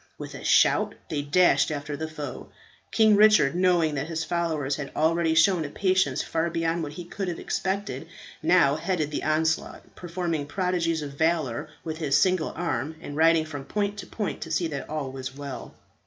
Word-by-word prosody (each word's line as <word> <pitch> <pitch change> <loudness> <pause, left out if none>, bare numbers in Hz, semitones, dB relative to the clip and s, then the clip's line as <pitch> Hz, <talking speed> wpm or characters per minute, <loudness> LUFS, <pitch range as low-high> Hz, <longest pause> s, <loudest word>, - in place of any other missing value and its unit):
With - - -8
a - - -9
shout - - +3 0.2
they 150 -2 -1
dashed 145 -1 +3
after 145 -1 -4
the 160 +2 -4
foe. 150 -4 -7 0.4
King 220 -2 +5
Richard, 210 -9 +5
knowing 175 -3 +2
that 140 +1 -3
his 165 -1 -3
followers 160 -6 -1
had 145 - -6
already 160 +1 +2
shown 165 +1 +4
a 145 - -5
patience 185 +4 +1
far 165 +1 -1
beyond 165 0 -1
what 150 -2 -5
he 175 +3 -8
could 195 +2 -5
have 175 -2 -3
expected, 195 +2 -3 0.3
now - - +4
headed 165 -6 -1
the - - -3
onslaught, 160 +1 -1
performing 170 -4 -3
prodigies 170 -2 -1
of 145 - -6
valour 155 -4 0
with 160 0 -5
his 150 -2 +2
single 185 -3 +2
arm, 155 -3 -2
and 145 - -8
riding 160 0 +4
from 145 -3 -7
point 205 +6 -2
to - - -7
point 210 -3 -4
to 165 - -6
see 165 +2 0
that 140 -3 -6
all 150 -3 -3
was 130 0 -6
well. 140 -2 -7
160 Hz, 185 wpm, -26 LUFS, 145-175 Hz, 0.4 s, King